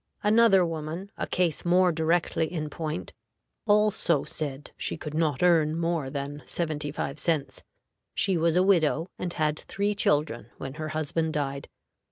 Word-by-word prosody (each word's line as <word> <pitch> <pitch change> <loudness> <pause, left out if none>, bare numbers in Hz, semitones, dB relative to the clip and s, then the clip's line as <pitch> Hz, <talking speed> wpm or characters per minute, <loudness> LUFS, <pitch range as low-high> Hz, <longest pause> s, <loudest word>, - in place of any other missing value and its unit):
Another 210 -3 +5
woman, 165 +4 -5
a - - -3
case 175 -4 0
more 180 +1 +4
directly 160 0 +1
in 155 -4 -3
point, 155 0 -4 0.5
also 205 -7 +3
said 145 -2 -5
she - - -3
could 150 -1 -7
not 155 -2 0
earn 160 -3 +4
more 165 -4 -1
than 140 +1 -5
seventy 155 -3 -3
five 140 0 -4
cents. 160 -5 -1 0.5
She 195 -2 +1
was 165 0 +2
a 180 - +5
widow, 170 -3 +2
and 180 - -2
had 155 -1 0
three 205 +1 -1
children 145 - +1
when 135 0 -6
her 155 - -2
husband 155 +1 -1
died. 140 -2 -2
160 Hz, 155 wpm, -27 LUFS, 150-175 Hz, 0.5 s, Another